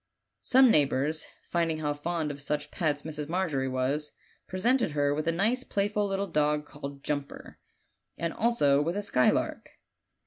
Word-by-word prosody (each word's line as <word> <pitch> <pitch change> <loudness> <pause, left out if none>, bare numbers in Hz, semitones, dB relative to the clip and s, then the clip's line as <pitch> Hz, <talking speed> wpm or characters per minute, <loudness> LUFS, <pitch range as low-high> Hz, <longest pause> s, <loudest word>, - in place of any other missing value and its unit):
Some 260 -1 +6
neighbors, 150 -1 +1 0.2
finding 165 -2 +1
how 150 -1 -1
fond 155 +1 -2
of 145 0 -8
such 150 +1 -3
pets 150 -5 -1
Mrs. 150 -1 -5
Margery 160 -7 0
was, 130 +4 -1 0.3
presented 230 - +1
her 145 -1 +2
with 155 +2 -3
a - - +4
nice 220 +9 +1
playful 205 -2 0
little 195 0 -1
dog 150 -3 +1
called 140 -1 -9
Jumper, 145 -1 -5 0.6
and 170 -1 -2
also 145 -12 +3
with 170 +6 -1
a 205 - -2
skylark. 125 -10 +1
155 Hz, 150 wpm, -28 LUFS, 145-190 Hz, 0.6 s, Some